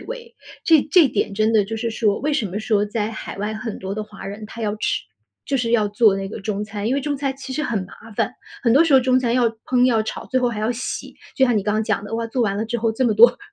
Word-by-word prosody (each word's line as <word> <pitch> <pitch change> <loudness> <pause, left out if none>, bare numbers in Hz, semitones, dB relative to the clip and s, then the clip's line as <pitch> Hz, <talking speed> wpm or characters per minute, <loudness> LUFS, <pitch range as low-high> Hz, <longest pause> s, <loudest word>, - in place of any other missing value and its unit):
味。 480 -1 -8 0.3
这 320 -4 +6
这 355 -5 +7
点 230 - -1
真 215 +2 +1
的 215 -3 +4
就 225 +3 -5
是 230 +1 -2
说 215 -2 +1
为 300 +3 -1
什 270 -7 0
么 195 +2 -4
说， 215 -2 +1
在 210 0 -2
海 215 - -7
外 210 +2 -2
很 220 0 -5
多 190 +1 -5
的 215 - -3
华 210 -2 -10
人 205 +2 -7
他 230 - -10
要 210 - 0
吃 210 - -1 0.4
就 275 - 0
是 240 -3 -1
要 220 -3 +3
做 210 -1 +3
那 195 0 -4
个 215 - -7
中 205 +1 -3
餐？ 210 0 -4
因 255 - +1
为 - - 0
中 290 +1 -2
餐 270 -1 -2
其 270 -1 -7
实 300 +3 -2
很 240 -7 -1
麻 225 +4 -14
烦， 250 - 0 0.3
很 230 - +4
多 280 +6 +6
时 330 -3 +1
候 270 - +8
中 255 0 +2
餐 245 -2 0
要 240 -1 +3
烹 245 +3 0
要 225 -3 +3
炒， 220 - -6
最 260 - 0
后 245 - +2
还 230 - -4
要 215 +3 0
洗， 245 +1 -5 0.2
就 265 - +5
像 245 -3 +2
你 205 - +1
刚 210 - 0
刚 215 +1 +1
讲 - - 0
的， 205 - -9
哇， 230 0 -2
做 240 +2 -1
完 200 -3 0
了 215 - -1
之 235 +1 -2
后 230 0 +1
这 225 +4 -1
么 225 -3 +2
多 235 +3 +7
225 Hz, 320 characters per minute, -21 LUFS, 210-255 Hz, 0.4 s, 候